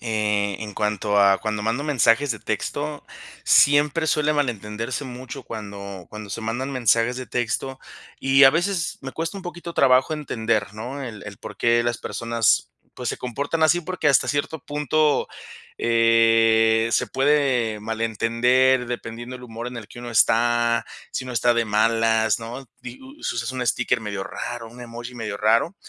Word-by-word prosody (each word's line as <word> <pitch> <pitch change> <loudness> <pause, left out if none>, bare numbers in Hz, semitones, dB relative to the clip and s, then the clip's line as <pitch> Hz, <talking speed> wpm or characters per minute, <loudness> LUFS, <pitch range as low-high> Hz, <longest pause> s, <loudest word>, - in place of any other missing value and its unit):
eh, 105 -3 0
en 105 -1 -6
cuanto 105 -1 0
a 100 -1 +5
cuando 105 0 -3
mando 115 +6 -1
mensajes 140 -1 +3
de 115 - -2
texto, 145 +9 -4 0.4
siempre 145 +2 +4
suele 150 -1 +2
malentenderse 120 -1 -2
mucho 130 +1 -8
cuando 100 -5 -8
cuando 105 -2 -8
se 110 - -4
mandan 120 +5 -3
mensajes 120 -1 +2
de 130 0 -6
texto, 130 +2 -2 0.4
y 135 +1 +5
a 135 - +9
veces 175 +1 -1
me 135 - -6
cuesta 165 +3 -4
un - - -10
poquito 175 -1 -7
trabajo 130 +3 +4
entender, 110 -8 -2
¿no?, 125 +6 -6
el 115 -5 -7
el 100 -1 -9
por - - -9
qué 120 0 +3
las 120 0 -1
personas, 115 -2 0 0.2
pues, 125 -1 -4
se - - -2
comportan 140 +6 -3
así, 175 +2 +4
porque 180 -2 -1
hasta 140 - +3
cierto 145 +2 -1
punto, 150 +1 +1 0.5
eh, 115 -1 +4
se - - +2
puede 135 -6 +1
malentender 115 +4 +2
dependiendo 120 +1 -6
el 125 - -14
humor 115 0 -7
en 125 - -6
el 110 - -10
que - - -12
uno 120 0 -7
está, 115 +1 +3 0.3
si 130 - -4
uno 130 - -6
está 120 +1 +2
de 115 0 +1
malas, 110 0 +2
¿no?, 120 +4 -8
di 125 0 -9
us 270 +3 -6
usas 120 +1 -3
un 125 -1 -3
sticker 120 0 +1
medio 100 -3 -4
raro, 115 +3 -6
un 125 - -13
emoji 120 +1 -8
medio 110 -4 -4
raro, 115 - +2
120 Hz, 170 wpm, -23 LUFS, 110-135 Hz, 0.5 s, a